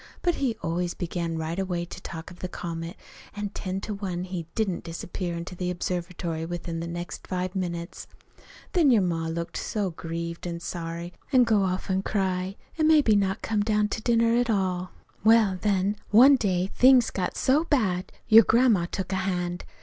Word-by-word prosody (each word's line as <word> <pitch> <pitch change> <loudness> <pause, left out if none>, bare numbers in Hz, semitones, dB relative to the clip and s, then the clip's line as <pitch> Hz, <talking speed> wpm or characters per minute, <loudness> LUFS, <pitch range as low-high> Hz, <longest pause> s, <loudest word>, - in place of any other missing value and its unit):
But 350 - +3
he 250 -5 0
always 175 +1 -1
began 170 -1 -3
right 160 +3 -3
away 180 -3 -2
to 175 - -10
talk 165 -1 -7
of 180 - -13
the 185 - -3
comet; 165 -1 -6 0.4
an' 205 0 -3
ten 190 -1 -4
to 215 - -4
one 185 -3 -3
he 180 -3 -5
didn't 205 -5 -1
disappear 170 +1 -4
into 170 +2 -6
the 180 0 -3
observatory 175 -2 -3
within 170 0 -4
the 165 - -4
next 175 +1 -6
five 185 0 -3
minutes. 170 -2 -4 0.7
Then 335 -7 +4
your 225 -6 +5
ma 165 -2 -1
would 165 - -3
look 170 0 -4
so 205 -4 -2
grieved 170 +1 -5
an' 170 -1 -4
sorry 170 0 -5 0.2
an' 255 -3 +6
go 220 -4 +3
off 185 -1 -1
an' 190 0 +1
cry, 190 -2 -1 0.2
an' 310 - +4
maybe 295 -9 +5
not 195 0 0
come 215 -2 0
down 210 0 +1
to 220 - -3
dinner, 230 0 +3
at 245 0 +1
all. 185 -3 0 0.3
"Well, 215 -4 +5
then, 200 0 +1
one 255 +7 +8
day 190 -6 0
things 255 -2 +6
got 185 -2 -2
so 290 +5 +3
bad 195 - 0 0.2
your 225 0 +9
grandma 225 -6 +3
took 190 +1 -4
a 190 - 0
hand. 180 -2 -2
185 Hz, 190 wpm, -26 LUFS, 175-210 Hz, 0.7 s, your